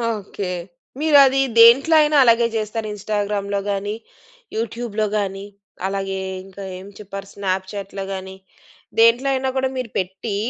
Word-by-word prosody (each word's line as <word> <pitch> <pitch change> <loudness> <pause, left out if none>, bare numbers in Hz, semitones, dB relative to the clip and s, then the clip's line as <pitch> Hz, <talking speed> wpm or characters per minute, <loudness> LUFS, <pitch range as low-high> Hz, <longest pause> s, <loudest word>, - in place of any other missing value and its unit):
Okay. 200 -2 -5 0.5
మీరది 280 -3 +5 0.2
దేంట్లో 265 +8 +7
అయినా 300 0 +3
అలాగే 235 -1 +4
జేస్తార? 215 0 -2
ఇన్‌స్టాగ్రామ్‌లో 205 -1 -2
గానీ, 205 +2 -2 0.6
యూట్యూబ్‌లో 225 -2 -2
గానీ, 195 -1 -3 0.4
అలాగే 195 0 -3 0.3
ఇంకా 195 +1 -10
ఏం 190 +2 -11
చెప్పారు? 195 -1 -8
స్నాప్‌చాట్‌లో 195 0 -4
గానీ, 190 0 -7 0.6
దేంట్లో 230 +4 +5
అయినా 265 0 0
గూడా 265 0 +1
మీరు 250 -2 -3
పెట్టి 190 +3 -4
205 Hz, 120 wpm, -21 LUFS, 195-235 Hz, 0.6 s, దేంట్లో